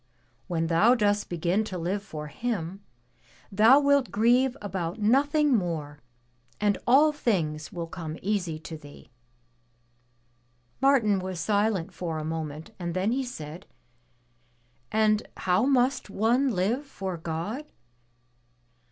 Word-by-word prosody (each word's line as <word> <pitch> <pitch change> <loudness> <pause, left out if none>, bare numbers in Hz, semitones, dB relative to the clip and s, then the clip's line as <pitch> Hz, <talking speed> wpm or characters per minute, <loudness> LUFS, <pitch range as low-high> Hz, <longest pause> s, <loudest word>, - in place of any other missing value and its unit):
When 165 -2 -1
thou 175 +9 +4
dost 205 -3 +1
begin 175 +4 0
to 185 -3 -5
live 180 +4 -2
for 155 -7 -7
Him, 195 +2 -4 0.7
thou 225 +7 +6
wilt 280 -3 +3
grieve 240 +6 +3
about 190 -2 -4
nothing 285 +6 +3
more, 160 -7 -3 0.6
and 205 -1 +1
all 285 +5 +6
things 165 - -1
will 175 -4 -4
come 165 -1 -7
easy 185 -5 -1
to 160 -1 -8
thee/' 145 -1 -15 1.7
Martin 240 -8 +4
was 185 -1 -5
silent 200 0 0
for 165 -2 -4
a 155 - -4
moment, 155 -1 -5
and 175 -1 -4
then 190 +4 +1
he 265 +2 0
said, 170 -7 -8 1.2
"And 215 0 +2
how 185 +7 +2
must 260 -2 +2
one 235 +7 +2
live 220 +6 0
for 190 -8 -5
God? 170 - -5
200 Hz, 125 wpm, -27 LUFS, 165-240 Hz, 1.7 s, thou